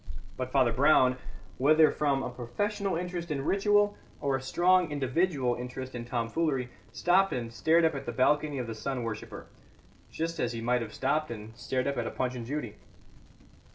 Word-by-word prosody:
But 130 0 -4
Father 130 -4 +3
Brown, 130 -1 +4 0.4
whether 155 +3 +5
from 140 -3 0
a 125 - -4
professional 195 - -2
interest 175 0 -4
in 140 -2 -2
ritual 205 +2 +3 0.2
or 140 -2 0
a 135 - -3
strong 175 +5 +3
individual 140 -1 0
interest 125 +2 -6
in 120 -1 -5
tomfoolery, 125 +2 -1 0.2
stopped 190 +2 +3
and 115 -2 -4
stared 160 +10 +3
up 160 - +2
at 140 - -6
the - - -1
balcony 145 +4 +2
of 125 - -2
the 115 - -5
sun 125 +3 -3
worshipper, 115 -2 -6 0.6
just 165 +1 -3
as 120 0 0
he 115 - -4
might 120 +1 +1
have 110 -2 -6
stopped 150 +3 0
and 110 -1 -8
stared 130 +2 -2
up 140 -1 -1
at 120 - -1
a - - -1
Punch 125 -1 -2
and 120 -2 -6
Judy. 150 +3 -4
135 Hz, 185 wpm, -29 LUFS, 125-160 Hz, 0.6 s, whether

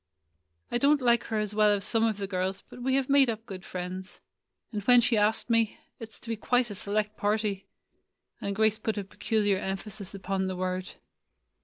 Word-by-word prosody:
"I 240 - +1
don't 290 +2 +4
like 240 -2 +3
her 220 - -2
as 210 -1 -1
well 210 0 +4
as 205 -1 +1
some 225 -2 +2
of 220 -2 +1
the 200 - -3
girls, 190 0 -2
but 245 - -11
we 260 +1 +1
have 270 -1 +1
made 275 -2 +5
up 225 0 -4
good 190 -4 -8
friends. 185 +1 -6 0.5
And 210 -2 -3
when 245 +1 +7
she 235 0 +3
asked 215 +1 +2
me 230 -2 +2
— - - -47
it 225 -1 -8
's - - -8
to 230 - -8
be 225 - 0
quite 245 +1 +1
a - - -3
select 210 +2 -2
party," 205 -1 -1 0.7
and 200 0 -2
Grace 220 +1 +2
put 220 -1 -2
a 205 - -1
peculiar 205 0 0
emphasis 195 +1 -5
upon 190 0 -2
the 185 - -3
word. 185 0 -3
210 Hz, 210 wpm, -28 LUFS, 195-230 Hz, 0.7 s, when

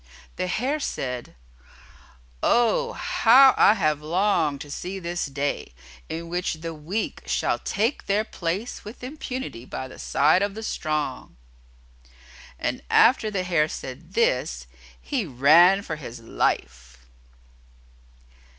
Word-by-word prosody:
The 185 - -2
Hare 260 +11 -1
said, 125 - -4 1.1
"Oh, 470 - +2
how 260 +3 +5
I 210 - +6
have 155 -6 0
longed 165 -3 +1
to 145 - -9
see 185 +6 -5
this 175 -3 -3
day, 140 - -3 0.3
in 165 +1 -5
which 175 0 -2
the 165 +1 -6
weak 165 +8 -4
shall - - 0
take 225 +7 -1
their 205 +2 +2
place 195 +3 -4
with 220 +4 -11
impunity 260 - -6
by 130 +1 -6
the 130 - -13
side 155 +6 +3
of 200 0 -1
the 220 - -6
strong." 150 - -3 1.2
And - - -2
after 230 -2 +5
the 195 -3 -2
Hare 165 -4 +1
said 150 +8 -8
this, 125 - +1 0.3
he 60 +1 -3
ran 170 +10 +5
for 155 - -5
his 125 -5 -9
life. 60 - -3
170 Hz, 125 wpm, -24 LUFS, 140-210 Hz, 1.2 s, I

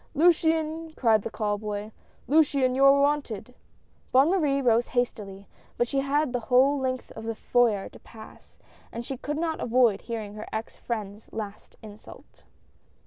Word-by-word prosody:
" - - -35
Luciane! 320 -1 +2
" - - -35
cried 225 -4 +3
the - - -5
call 205 -1 -2
boy, 210 0 -5 0.2
" - - -34
Luciane, 280 -3 +3
you 270 +1 +2
are 275 +1 +7
wanted! 280 -5 -1 0.3
" - - -37
Bonne 270 +6 +5
Marie 295 -7 +1
rose 240 -2 +2
hastily, 210 -5 -3 0.3
but 240 - +1
she 275 - -1
had 280 0 0
the 245 - 0
whole 270 +3 +4
length 255 -1 -3
of 220 - -9
the 225 0 -4
foyer 220 -4 +1
to - - -15
pass, 220 -1 -15 0.3
and 235 +1 -6
she 270 - -4
could 295 +4 -4
not 320 -1 -2
avoid 235 -4 +2
hearing 220 -3 -6
her 215 +1 -8
ex 220 +1 -5
friend's 210 -2 -6
last 210 -2 -7
insult. 210 -1 -14
245 Hz, 180 wpm, -26 LUFS, 220-280 Hz, 0.3 s, are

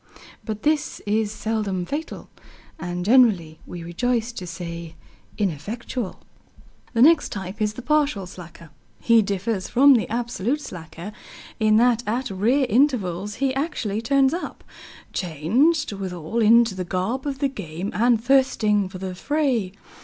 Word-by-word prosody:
But 215 -2 -5
this 300 0 0
is 210 0 0
seldom 210 -5 -2
fatal, 300 - -6 0.5
and 175 0 -4
generally, 200 -10 +4
we 175 -1 -7
rejoice 230 +7 -1
to 185 -6 -7
say, 170 -1 -7 0.4
ineffectual. 205 - -3 0.7
The 230 - +5
next 325 +2 +5
type 195 +2 -6
is 210 0 +1
the 250 - -9
partial 295 -9 +1
slacker. 170 -3 -12 0.3
He 230 -1 +5
differs 200 0 -2
from 280 +3 +6
the 235 -4 +1
absolute 240 +3 -1
slacker 175 - -8 0.5
in 215 -1 +4
that 240 0 +4
at 240 +2 -1
rare 235 +9 +2
intervals 210 - +1
he 270 +1 0
actually 255 - -2
turns 270 +3 +3
up, 350 - -5 0.5
changed 225 - +1
withal 185 +1 -4
into 230 0 +5
the 185 -1 -4
garb 190 +10 -2
of 275 -2 -2
the 280 0 +1
game, 190 - -6
and 235 +1 +3
thirsting 230 -7 +3
for 190 - -8
the 185 0 -5
fray. 255 -3 0
215 Hz, 140 wpm, -23 LUFS, 185-255 Hz, 0.7 s, from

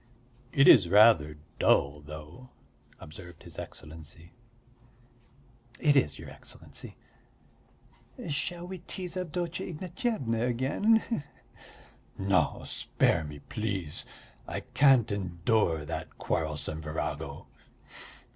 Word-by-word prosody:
'" 125 +2 -30
"It 140 +1 +5
is 95 -9 +8
rather 90 -7 +6 0.2
dull, 70 +1 +3
though," 75 - -10 0.5
observed 85 +1 -11
his - - -8
Excellency. 80 +2 -9 1.5
"It 145 -2 +4
is, 75 - +3
your - - -9
Excellency. - - -10 1.3
Shall 170 +4 -2
we 185 0 -6
tease 180 0 -3
Avdotya 175 -1 -3
Ignatyevna 170 - -2
again, 145 - +2
he 235 - 0
he?" - - -3 1.0
"No, 95 -1 +1
spare 80 - +1
me, 75 -1 -8
please. 100 -8 -3 0.4
I - - -4
can't 130 -6 +4
endure 85 -3 0
that 80 - -6
quarrelsome 80 0 -2
virago." 75 0 -4
105 Hz, 100 wpm, -29 LUFS, -, 1.5 s, is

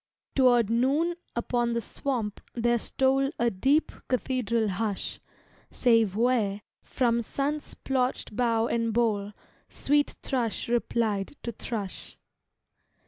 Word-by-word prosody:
Toward 245 -5 +4
noon 275 +9 +2 0.2
upon 235 0 0
the 235 - +1
swamp 230 -4 -3
there 240 0 +2
stole 270 +3 +2
A 235 0 +2
deep, 275 +11 +2 0.2
cathedral 240 -3 0
hush, 200 +1 -2 0.5
Save 225 -5 +3
where, 220 -4 +1 0.2
from 235 -2 +1
sun 280 +6 -1
splocht 260 -6 -2
bough 230 -2 +2
and 230 -1 0
bole, 210 -4 +1 0.4
Sweet 290 0 +1
thrush 235 -8 -1
replied 230 -2 0
to 235 - -3
thrush. 210 -3 -6
235 Hz, 110 wpm, -28 LUFS, 220-255 Hz, 0.5 s, Toward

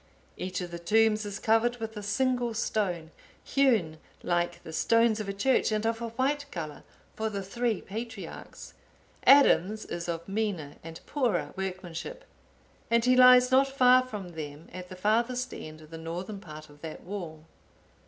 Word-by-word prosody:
Each 185 0 -4
of 175 -1 -6
the 170 - -6
tombs 215 +4 +2
is 200 -1 -5
covered 225 +3 +2
with 225 -1 -6
a 210 - -5
single 240 +3 0
stone, 180 -7 -1 0.3
hewn 220 - +2 0.2
like 175 0 -1
the 160 - -9
stones 230 +4 +3
of 210 -2 -4
a - - 0
church, 220 +5 +2
and 215 0 0
of 225 0 -1
a 235 - -2
white 275 +5 -1
colour, 155 - -6 0.3
for 220 0 -2
the 200 -2 -4
three 230 +3 -1
patriarchs. 225 0 -8 0.5
Adam's 215 -7 +5
is 175 0 -5
of 170 0 -4
meaner 195 -8 -3
and 165 0 -9
poorer 245 - -1
workmanship, 190 - -6 0.6
and 235 0 +3
he 255 0 +5
lies 250 0 +7
not 270 +1 +5
far 255 -2 +5
from 210 -8 -7
them 155 -1 -8
at 180 0 -8
the 185 - -8
farthest 235 +6 0
end 155 0 -9
of 155 0 -15
the 165 - -7
northern 175 +5 -5
part 155 -4 -10
of 145 0 -18
that 160 -1 -8
wall. 170 -5 -7
210 Hz, 170 wpm, -28 LUFS, 175-235 Hz, 0.6 s, lies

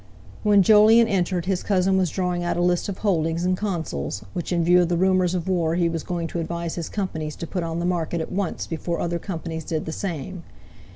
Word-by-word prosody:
When 205 -2 +5
Jolyon 220 +3 +6
entered, 180 -4 0
his 185 -1 0
cousin 190 -1 +2
was 185 -2 +2
drawing 180 0 -1
out 175 - -1
a - - +1
list 175 +2 +1
of 195 - -4
holdings 170 -4 0
in 185 0 +2
Consols, 160 - -3
which 175 - -4
in 170 -1 +2
view 180 +2 +5
of 175 - +1
the 175 - +1
rumours 185 0 +2
of 175 -1 -3
war 170 -3 +1
he 175 -1 +2
was 165 -1 -3
going 175 -2 -3
to 170 - -3
advise 170 0 -3
his 170 -2 -4
companies 160 -7 -3
to - - -6
put 180 +2 -3
on 165 -1 -3
the 170 - -1
market 170 -2 -1
at 160 - -4
once, 190 -2 -2
before 170 +1 -3
other 170 0 -1
companies 165 -4 -5
did 155 0 -3
the 160 - -4
same. 175 0 -5
175 Hz, 230 wpm, -24 LUFS, 165-185 Hz, -, Jolyon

